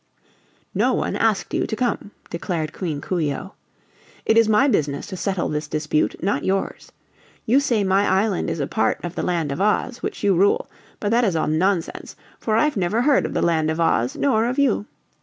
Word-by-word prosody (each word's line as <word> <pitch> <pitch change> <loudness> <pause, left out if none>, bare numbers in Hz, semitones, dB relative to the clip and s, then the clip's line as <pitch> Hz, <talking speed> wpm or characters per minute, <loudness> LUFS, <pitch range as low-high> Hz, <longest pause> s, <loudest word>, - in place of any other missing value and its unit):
"No - - +2
one - - -1
asked 215 -4 0
you - - 0
to - - -3
come," 240 -3 -2 0.2
declared 165 -2 -3
Queen 155 -6 -4
Coo 180 +3 -2
ee 145 -3 0
oh. 195 - -8 0.7
"It 220 - +3
is 230 -1 +5
my 220 +6 +4
business 145 - 0
to 200 - -7
settle 190 -1 -1
this 150 0 -3
dispute, 155 0 0
not 190 -7 0
yours. 195 0 -2 0.5
You 250 +5 +4
say 235 -7 +1
my 195 +1 +2
island 195 0 +1
is - - -3
a 140 - 0
part 220 - 0
of 175 - -5
the - - -3
Land 165 -5 -1
of 140 - -3
Oz, 215 +4 0
which - - -5
you 200 -1 +4
rule, 195 +3 +2 0.3
but 205 - -1
that 240 +2 +3
is 195 -7 +1
all 160 - +1
nonsense, 170 +3 -1 0.2
for 220 - 0
I've 255 +3 +2
never 195 +6 +1
heard 285 0 +3
of - - -7
the - - +1
Land 160 -2 +2
of 160 +1 -2
Oz, 130 -7 +1
nor 230 -5 +2
of 250 - -2
you. 260 -6 +1
190 Hz, 210 wpm, -22 LUFS, 160-220 Hz, 0.7 s, is